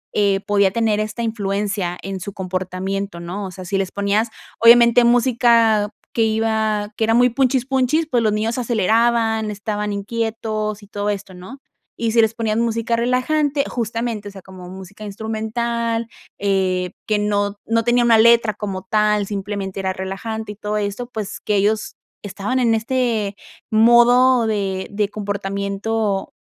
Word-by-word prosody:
eh, 200 -2 +2
podía 200 -1 +3
tener 220 -1 +1
esta 215 +2 -3
influencia 200 -4 -2
en 195 0 -5
su 195 +2 -7
comportamiento, 185 +1 -4
¿no? 180 +4 -5
O - - -9
sea, 185 +1 -9
si 195 +2 -1
les 190 -1 -2
ponías, 200 +3 0 0.3
obviamente, 235 +1 +7
música 235 -3 +3 0.2
que 230 - 0
iba 220 -1 0
que - - -1
era 225 +1 +3
muy 245 +1 +5
punchis 255 0 +1
punchis, 270 +4 +1
pues 245 -2 +2
los 220 -2 +2
niños 220 +4 -1
aceleraban, 225 -1 +1
estaban 210 0 -3
inquietos, 215 0 -3
y 205 - -14
todo 205 0 -3
esto, 200 -2 -4
¿no? 185 +9 -10 0.4
Y 230 -1 -1
si 230 - +5
les 220 0 +2
ponían 225 -1 -1
música 230 0 0
relajante, 275 +5 +1
justamente, 230 -2 -3
o - - -12
sea, 195 -1 -11
como 185 -1 -11
música 190 +3 -11
instrumental, 225 +2 -2 0.3
eh, 185 -2 0 0.2
que 215 - +2
no 205 -1 0
no 230 0 +1
tenía 240 +1 +3
una 230 -2 +5
letra 230 -1 +5
como 195 -3 -5
tal, 210 +1 +1
simplemente 195 -1 -4
era 190 -1 -1
relajante, 210 +4 -5
y - - -17
todo 210 +1 -3
esto, 210 +4 -3
pues 215 -3 -5
que 210 - -1
ellos 210 +2 0 0.3
estaban 205 +6 -2
en 230 -2 +3
este 225 -3 -1 0.4
modo 240 +2 +5
de 195 -3 -2
de 205 0 -1
comportamiento 200 0 -2
215 Hz, 160 wpm, -20 LUFS, 200-230 Hz, 0.4 s, obviamente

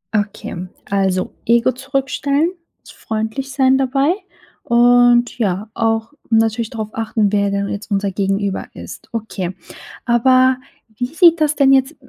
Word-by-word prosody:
Okay, 200 -3 -3 0.2
also, 190 -2 0
Ego 235 +2 +3
zurückstellen, 275 +4 -1 0.3
s - - -14
freundlich 220 +5 -4
sein 265 -1 +3
dabei 270 +4 +1 0.5
und, 240 0 +4
ja, 205 -1 -1
auch 225 +2 -1 0.2
natürlich 225 0 +1
darauf 220 -4 -5
achten, 220 -2 0
wer 200 -1 +1
denn 200 0 -1
jetzt 205 +2 -6
unser 200 0 0
Gegenüber 195 0 -2
ist. - - -10
Okay, 210 -5 -4 0.5
aber 255 +2 +4 0.4
wie 245 +3 -2
sieht 330 +3 +4
das 300 0 +2
denn 270 -1 +4
jetzt 265 +4 +2
235 Hz, 135 wpm, -18 LUFS, 205-265 Hz, 0.5 s, und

